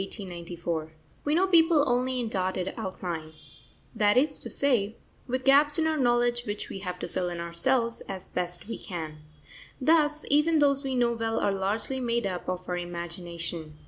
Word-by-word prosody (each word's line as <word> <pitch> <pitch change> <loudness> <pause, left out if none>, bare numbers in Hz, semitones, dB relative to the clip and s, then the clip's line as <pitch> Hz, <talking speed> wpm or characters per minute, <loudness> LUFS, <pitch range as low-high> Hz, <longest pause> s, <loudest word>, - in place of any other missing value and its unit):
_ 170 -5 -5 0.3
We 295 +1 +1
know 365 +3 +4
people 325 -5 +5
only 250 +1 +1
in 240 - -1
dotted 185 -3 -1
outline, 170 -4 -5 0.6
that 210 +1 +3
is 285 +2 +3
to - - -6
say, 230 -6 +1 0.3
with 255 +1 -2
gaps 290 +2 +6
in 320 - +2
our 320 0 +2
knowledge 240 -3 +2
which 205 0 -4
we 195 - -6
have 180 -2 -5
to - - -5
fill 180 -1 -2
in 175 -1 -5
ourselves, 230 +8 0
as 190 -1 -6
best 180 +3 -2
we 230 - -5
can. 160 -5 -6 0.6
Thus, 300 +1 +3
even 305 +3 +4
those 280 -1 +3
we 265 -1 -2
know 240 -1 +3
well 225 -1 -1
are 200 - +1
largely 205 +7 -1
made 235 -2 0
up 185 -2 -3
of 180 0 -4
our 180 - -1
imagination. 170 -2 -5
220 Hz, 175 wpm, -28 LUFS, 180-265 Hz, 0.6 s, gaps